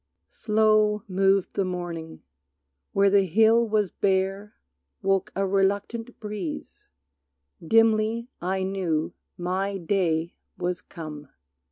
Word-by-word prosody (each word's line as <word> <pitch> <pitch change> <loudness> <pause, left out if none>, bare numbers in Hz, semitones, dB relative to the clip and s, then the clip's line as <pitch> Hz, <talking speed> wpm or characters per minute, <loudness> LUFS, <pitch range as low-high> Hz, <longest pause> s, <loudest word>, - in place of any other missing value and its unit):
Slow 215 - +2
moved 195 0 +2
the 200 - 0
morning; 175 -3 -5 0.7
where 200 0 +3
the 200 -1 +4
hill 225 +5 +4
was 210 -3 +1
bare 195 +1 -1 0.5
Woke 195 -1 +1
a 195 +1 +1
reluctant 200 +5 -1
breeze. 210 -6 -6 0.8
Dimly 225 +4 +3
I 190 +2 -1
knew 185 -5 -1 0.2
My 190 +3 -2
Day 170 -2 0 0.2
was 180 0 -2
come. 150 -4 -9
195 Hz, 100 wpm, -25 LUFS, 180-210 Hz, 0.8 s, the